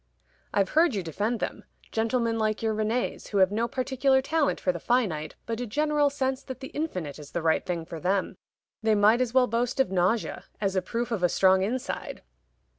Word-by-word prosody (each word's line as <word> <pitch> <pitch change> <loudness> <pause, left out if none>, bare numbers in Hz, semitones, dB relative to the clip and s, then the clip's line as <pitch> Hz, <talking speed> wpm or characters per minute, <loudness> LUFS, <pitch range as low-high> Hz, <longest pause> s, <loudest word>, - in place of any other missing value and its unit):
"I've 195 -2 +1
heard 320 -5 +4
you 195 - -1
defend 205 +8 -2
them - - -4 0.3
gentlemen 230 0 0
like 215 0 0
your 220 -1 +1
Rénés, 220 +3 -1
who 205 - -2
have 190 0 +5
no 225 +3 0
particular 265 +2 +2
talent 300 +2 0
for 185 - +1
the 175 - -6
finite, 180 -10 0
but 230 0 -3
a 245 - -3
general 295 +4 +2
sense 265 -1 -1
that 260 -3 -8
the 265 - -7
infinite 180 - -4
is 145 -1 -10
the 170 - -1
right 160 -1 +2
thing 170 -3 -3
for 165 -1 -7
them. 185 +3 0 0.5
They 220 -1 +3
might 215 +4 +5
as 250 0 -1
well 260 -1 +6
boast 245 +2 -1
of 265 - +2
nausea 190 +5 0
as 195 -2 -1
a 185 - +2
proof 235 +6 -3
of 220 -5 -1
a 180 - +3
strong 190 +1 +4
inside." 240 +6 -3
225 Hz, 205 wpm, -27 LUFS, 190-255 Hz, 0.5 s, well